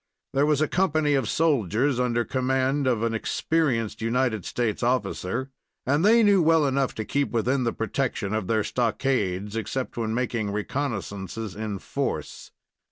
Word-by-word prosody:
There 140 Hz, +2 st, +3 dB
was 150 Hz, -1 st, +2 dB
a 155 Hz, -, +3 dB
company 155 Hz, -5 st, +1 dB
of 135 Hz, -6 st, +1 dB
soldiers 135 Hz, -, +1 dB
under 120 Hz, -1 st, +1 dB
command 130 Hz, +1 st, 0 dB
of 115 Hz, -3 st, +1 dB
an 115 Hz, -1 st, 0 dB
experienced 115 Hz, -3 st, 0 dB
United 115 Hz, -3 st, 0 dB
States 115 Hz, -4 st, -1 dB
officer, 125 Hz, 0 st, -1 dB, 0.3 s
and 145 Hz, +5 st, +2 dB
they 225 Hz, +3 st, +6 dB
knew 200 Hz, -3 st, +5 dB
well 160 Hz, -1 st, +4 dB
enough 135 Hz, -1 st, 0 dB
to 110 Hz, -, -4 dB
keep 140 Hz, +4 st, 0 dB
within 125 Hz, +3 st, 0 dB
the 115 Hz, -, +1 dB
protection 115 Hz, -3 st, -2 dB
of 110 Hz, -4 st, -1 dB
their 110 Hz, 0 st, +1 dB
stockades, 110 Hz, -4 st, -1 dB
except 125 Hz, +4 st, -3 dB
when 110 Hz, -1 st, -1 dB
making 115 Hz, -4 st, -1 dB
reconnoissances 105 Hz, -3 st, -4 dB
in 105 Hz, -1 st, -4 dB
force. -, -, -4 dB
125 Hz, 155 wpm, -25 LUFS, 110-140 Hz, 0.3 s, they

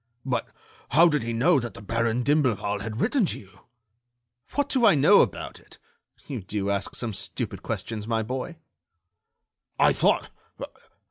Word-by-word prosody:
"But 130 Hz, -2 st, -1 dB, 0.5 s
how 170 Hz, +3 st, +7 dB
did 150 Hz, -4 st, +1 dB
he 115 Hz, +1 st, -3 dB
know 135 Hz, +7 st, +3 dB
that 120 Hz, -2 st, -6 dB
the -, -, -10 dB
Baron 115 Hz, +3 st, 0 dB
d'Imblevalle 115 Hz, -8 st, +1 dB
had 110 Hz, +2 st, -5 dB
written 250 Hz, -, +2 dB
to -, -, -3 dB
you?" 95 Hz, -1 st, -18 dB, 1.0 s
"What 285 Hz, -1 st, +1 dB
do 260 Hz, -3 st, 0 dB
I 200 Hz, -, +7 dB
know 140 Hz, -, +6 dB
about -, -, -3 dB
it? -, -, -16 dB, 0.5 s
You 130 Hz, -6 st, -5 dB
do 100 Hz, +1 st, -2 dB
ask 100 Hz, 0 st, -2 dB
some 115 Hz, -3 st, -3 dB
stupid -, -, -5 dB
questions, 110 Hz, -2 st, -5 dB
my 115 Hz, -1 st, 0 dB
boy." 130 Hz, +9 st, -5 dB, 1.2 s
"I -, -, +5 dB
thought -, -, +1 dB
115 Hz, 155 wpm, -26 LUFS, 105-145 Hz, 1.2 s, how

